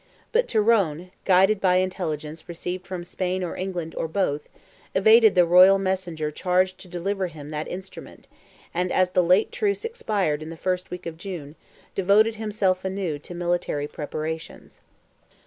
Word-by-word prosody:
But 485 +1 +2
Tyrone, 195 -7 +2
guided 195 +2 +4
by 180 -1 +4
intelligence 165 -4 -2
received 180 +2 -5
from 185 -2 -5
Spain 185 +1 -2
or 175 - -4
England, 180 -3 -4
or - - -2
both, 155 -4 -1 0.5
evaded 220 +2 +6
the 180 -1 +6
royal 185 +3 +7
messenger 185 -5 -2
charged 185 +3 +1
to - - -11
deliver 185 +2 -2
him 150 -3 -10
that 150 0 -4
instrument, 190 +2 -9 0.5
and 180 +1 -1
as 185 -1 +2
the 180 - +3
late 180 +4 +3
truce 410 +1 -1
expired 210 - -1
the 160 +1 -8
first 180 +1 -2
week 180 - -7
of 165 -1 -6
June, 165 -6 -7 0.4
devoted 210 +4 +3
himself 205 -4 0
anew 190 -5 -3
to 175 +4 -10
military 175 -4 -1
preparations. 155 +2 -6
180 Hz, 150 wpm, -24 LUFS, 165-195 Hz, 0.5 s, royal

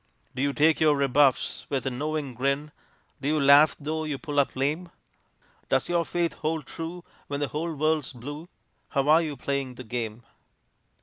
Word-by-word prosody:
Do 130 - -3
you 140 +1 +2
take 155 +3 +3
your 155 -2 +4
rebuffs 140 -1 +2
with 135 -3 -1
a 135 - 0
knowing 145 +1 -3
grin? 140 +4 -1 0.5
Do 140 - -2
you 155 +1 +2
laugh 140 +2 +7
tho' 155 +2 -3
you 150 -3 -2
pull 145 -1 -2
up 140 - +1
lame? 150 +7 -1 0.8
Does - - +1
your 170 -1 +1
faith 170 -1 -1
hold 155 -1 -1
true 170 +2 -7 0.2
when 140 0 -3
the 145 - -1
whole 160 +2 -3
world's 155 -1 0
blue? 145 +7 -8 0.4
How 140 0 0
are 160 +2 +7
you 150 -4 -4
playing 135 0 -2
the 130 - -8
game? 115 -1 -4
145 Hz, 180 wpm, -27 LUFS, 135-155 Hz, 0.8 s, laugh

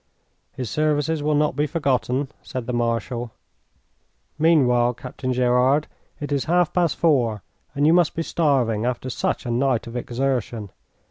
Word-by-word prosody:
"His 125 - -5
services 150 +2 0
will 150 +1 +1
not 150 -2 +1
be 150 +2 +1
forgotten," 135 -3 0
said 130 -4 -6
the 125 - -3
Marshal. 120 0 -1 1.1
"Meanwhile, 125 -7 +3
Captain 130 +1 -5
Gerard, 125 +4 +3 0.3
it 145 0 -5
is 140 -2 0
half 175 0 +2
past 175 -4 +2
four, 120 - +1 0.3
and 145 +1 +2
you 160 - +5
must 175 -2 +3
be 165 - -1
starving 130 -11 +1
after 125 +1 -2
such - - -2
a 120 - -2
night 125 -1 +1
of 115 0 -9
exertion. 120 -4 -2
130 Hz, 150 wpm, -23 LUFS, 120-150 Hz, 1.1 s, you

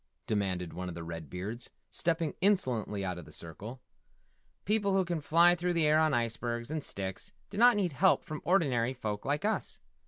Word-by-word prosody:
demanded 95 -5 -1
one 90 +1 -4
of 85 - -7
the 85 - -6
Red 80 -3 -7
Beards, 105 +7 -5 0.2
stepping 165 -2 +1
insolently 125 - +1
out 90 -2 -3
of 85 - -10
the - - -14
circle. 105 +10 -8 0.8
"People 205 -1 +1
who 190 -1 +3
can 170 -2 -2
fly 170 +4 +5
through 175 0 -1
the 165 -2 +2
air 155 +1 +5
on 155 -1 +3
icebergs 120 +1 -1
and 155 -2 -2
sticks 95 -5 -3 0.2
do 200 - -7
not 245 +1 +7
need 190 -4 +1
help 185 +7 +3
from 155 -1 -6
ordinary 135 -9 +2
folk 105 -4 -4
like 145 +6 0
us. 220 - -1
130 Hz, 190 wpm, -31 LUFS, -, 0.8 s, not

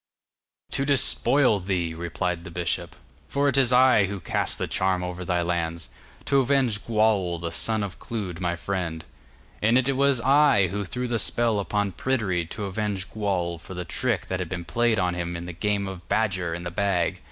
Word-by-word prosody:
'To 135 - +1
despoil 140 -3 +5
thee,' 90 -3 -2
replied 85 +1 -3
the - - -8
bishop, 85 -1 -3 0.3
'for 140 +1 +1
it 140 - +1
is 130 -3 +4
I 125 -5 +5
who 100 0 -5
cast - - -1
the - - -1
charm 95 -1 0
over 90 0 -5
thy 90 -1 0
lands, 85 -1 -2 0.4
to 140 - +3
avenge 130 -6 +1
Gwawl 105 -6 +1
the 85 0 -4
son 105 +8 0
of 100 -3 -6
Clud 100 -7 -5
my 85 -1 -1
friend. 85 -3 -4 0.6
And 115 +4 +4
it 130 +1 +1
was 140 -1 +3
I 135 - +4
who 100 +2 -3
threw 125 +5 -3
the 120 -1 -1
spell 115 0 +1
upon 100 0 -1
Pryderi 95 -6 -1
to 105 - -5
avenge 100 -2 -3
Gwawl 90 -5 -2
for 90 +3 -10
the 90 0 -5
trick 115 +1 -1
that 95 - -3
had 90 -3 -4
been 90 -2 -5
played 115 +7 +1
on 90 -2 +1
him 85 0 -4
in 85 - -7
the 90 - -6
game 100 +2 -1
of 90 -3 -9
Badger 95 -6 0
in 85 - -7
the 85 - -5
Bag. 95 -2 0
95 Hz, 195 wpm, -25 LUFS, 85-115 Hz, 0.6 s, despoil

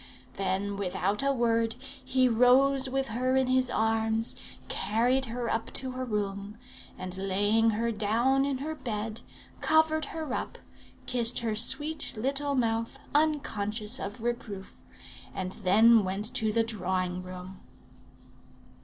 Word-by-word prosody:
Then, 195 +1 -2
without 195 +2 -1
a 275 0 +2
word, 230 -3 +1
he 260 -1 0
rose 260 +3 +4
with 270 -1 -1
her 255 +3 0
in 265 0 +3
his 255 0 +3
arms, 225 0 +1 0.3
carried 245 +5 +1
her 240 0 -4
up 225 0 -2
to 260 0 0
her 255 0 -4
room, 205 -1 -3 0.4
and 185 0 -6
laying 205 +4 +2
her 230 +2 0
down 230 +6 +2
in 275 -1 -1
her 300 +4 -4
bed, 225 -6 -4 0.4
covered 315 0 +3
her 310 -3 -5
up, - - -4 0.5
kissed 240 -1 0
her 225 -2 -1
sweet 295 +8 +2
little 275 +4 0
mouth 230 -2 0 0.2
unconscious 235 -7 0
of 205 +4 -6
reproof, 225 -5 -5 0.5
and 185 -1 -3
then 220 +4 +6
went 195 +4 -3
to 220 -2 0
the 230 +1 +2
drawing 185 -4 -2
room. 185 +1 -9
230 Hz, 135 wpm, -29 LUFS, 205-260 Hz, 0.5 s, then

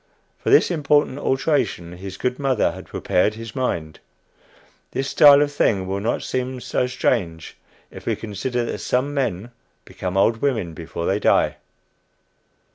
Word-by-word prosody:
For - - -2
this 415 - +5
important 145 -3 +2
alteration 130 - 0
his 95 +1 -8
good 125 +1 -2
mother 135 -2 +1
had - - -10
prepared 105 +4 0
his 115 +2 -9
mind. 85 - -2 0.9
This 135 0 -2
style 145 -1 +8
of 145 - -2
thing 100 -9 +1
will 95 +1 -2
not 115 +4 -1
seem 130 0 -3
so 125 - -1
strange 100 -10 -1 0.4
if - - -12
we - - +1
consider 120 +3 -3
that - - -4
some 135 +3 -1
men 120 -5 -2 0.3
become 90 0 -5
old 110 +3 +3
women 110 -10 -1
before 85 +1 -6
they 95 +3 +1
die! - - +2
120 Hz, 150 wpm, -22 LUFS, 95-135 Hz, 0.9 s, style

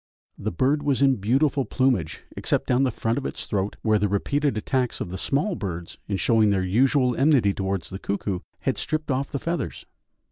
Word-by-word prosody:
The - - -3
bird 135 - +1
was 140 -2 +1
in 135 -1 +4
beautiful 135 +7 +2
plumage, 125 - 0
except - - 0
down 125 +1 +2
the 135 - +3
front 115 +2 -1
of 135 - -8
its - - -6
throat, 100 -1 -1
where 110 -1 +3
the 105 - +2
repeated 140 +7 0
attacks 125 +2 -1
of 85 - -4
the - - -4
small 150 - 0
birds 85 - -5
in 100 - -1
showing 110 +1 +3
their 95 -2 +1
usual 125 +5 +3
enmity 135 -8 +4
towards 95 -1 -3
the 95 - -5
cuckoo, 100 -2 -2 0.2
had - - -1
stripped 155 -1 -2
off 135 +1 -1
the - - -1
feathers. 165 -2 -3
125 Hz, 200 wpm, -25 LUFS, 100-140 Hz, 0.2 s, in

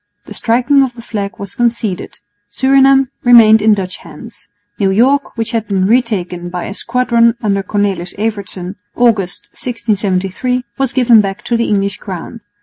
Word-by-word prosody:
The - - -10
striking 250 +5 +2
of 255 -3 -1
the 235 - -10
flag 200 -3 -5
was 200 -1 -7
conceded. 235 -6 -2 0.3
Surinam 270 +3 +3
remained 225 -3 +6
in 215 0 +4
Dutch 185 -2 -5
hands. 175 +3 -13 0.3
New 195 -2 +2
York, 255 +8 +1
which 225 +1 -1
had 225 -2 -2
been 190 -2 0
retaken 190 -6 -1
by 180 0 -5
a 200 - -6
squadron 235 0 +1
under 200 -2 0
Cornelis 195 -3 -2
Evertsen, 200 -3 -4 0.2
August, 215 -7 0
1673, 215 +1 -2 0.2
was 270 -1 0
given 240 -4 +5
back 195 +1 -5
to 240 - -1
the 230 0 0
English 200 -1 0
crown. 195 +4 -8
215 Hz, 155 wpm, -14 LUFS, 195-240 Hz, 0.3 s, remained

